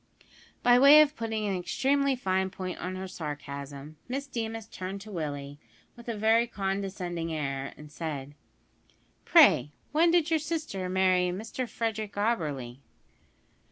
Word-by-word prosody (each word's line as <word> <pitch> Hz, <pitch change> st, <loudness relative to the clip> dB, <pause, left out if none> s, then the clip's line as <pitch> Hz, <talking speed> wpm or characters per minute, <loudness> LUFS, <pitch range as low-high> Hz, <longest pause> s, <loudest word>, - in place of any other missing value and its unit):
By 245 Hz, 0 st, +6 dB
way 280 Hz, +3 st, +9 dB
of 300 Hz, 0 st, +2 dB
putting 225 Hz, -3 st, -2 dB
an 200 Hz, -2 st, 0 dB
extremely 270 Hz, +10 st, +1 dB
fine 190 Hz, -5 st, 0 dB
point 185 Hz, -1 st, -6 dB
on 185 Hz, +1 st, -4 dB
her 190 Hz, 0 st, -5 dB
sarcasm, 145 Hz, -2 st, -7 dB
Miss 270 Hz, +3 st, -3 dB
Deemas 225 Hz, -4 st, -4 dB
turned 190 Hz, -1 st, -6 dB
to 215 Hz, +1 st, -10 dB
Willie, 145 Hz, -4 st, -5 dB, 0.4 s
with 235 Hz, 0 st, -10 dB
a 225 Hz, -, -3 dB
very 225 Hz, +3 st, +3 dB
condescending 190 Hz, -5 st, -3 dB
air, 140 Hz, -3 st, -3 dB
and 150 Hz, 0 st, -12 dB
said: 145 Hz, -3 st, -5 dB, 0.9 s
"Pray, 145 Hz, +4 st, +6 dB, 0.2 s
when 325 Hz, +4 st, +4 dB
did 335 Hz, -2 st, +2 dB
your 320 Hz, -, +3 dB
sister 300 Hz, -, -3 dB
marry 185 Hz, -1 st, +3 dB
Mr 225 Hz, +6 st, -4 dB
Frederick 220 Hz, -2 st, -3 dB
Auberly?" 150 Hz, -, -1 dB
190 Hz, 140 wpm, -28 LUFS, 155-235 Hz, 0.9 s, way